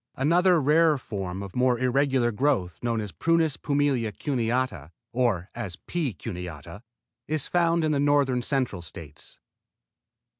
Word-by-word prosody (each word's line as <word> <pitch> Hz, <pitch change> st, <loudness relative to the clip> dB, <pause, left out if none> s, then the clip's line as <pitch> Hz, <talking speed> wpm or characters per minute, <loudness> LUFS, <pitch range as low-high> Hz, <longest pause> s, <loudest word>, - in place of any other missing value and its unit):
Another 175 Hz, +5 st, +3 dB
rarer 155 Hz, +2 st, +4 dB
form 95 Hz, -6 st, -5 dB
of 100 Hz, -2 st, -9 dB
more 125 Hz, -1 st, +3 dB
irregular 130 Hz, -1 st, +2 dB
growth 105 Hz, -, 0 dB
known 115 Hz, -2 st, 0 dB
as 105 Hz, -2 st, -6 dB
Prunus 165 Hz, -, +1 dB
pumila 140 Hz, -6 st, 0 dB
cuneata, 120 Hz, -, -2 dB, 0.2 s
or 115 Hz, -7 st, 0 dB
as 110 Hz, -8 st, -5 dB
P. 155 Hz, -, -3 dB
cuneata, 90 Hz, -, -8 dB, 0.5 s
is 155 Hz, -2 st, 0 dB
found 170 Hz, -1 st, +2 dB
in 155 Hz, -, +1 dB
the 145 Hz, -, +1 dB
North 140 Hz, -3 st, +2 dB
Central 130 Hz, -10 st, -1 dB
States. 75 Hz, -3 st, -9 dB
125 Hz, 135 wpm, -26 LUFS, 100-145 Hz, 0.5 s, rarer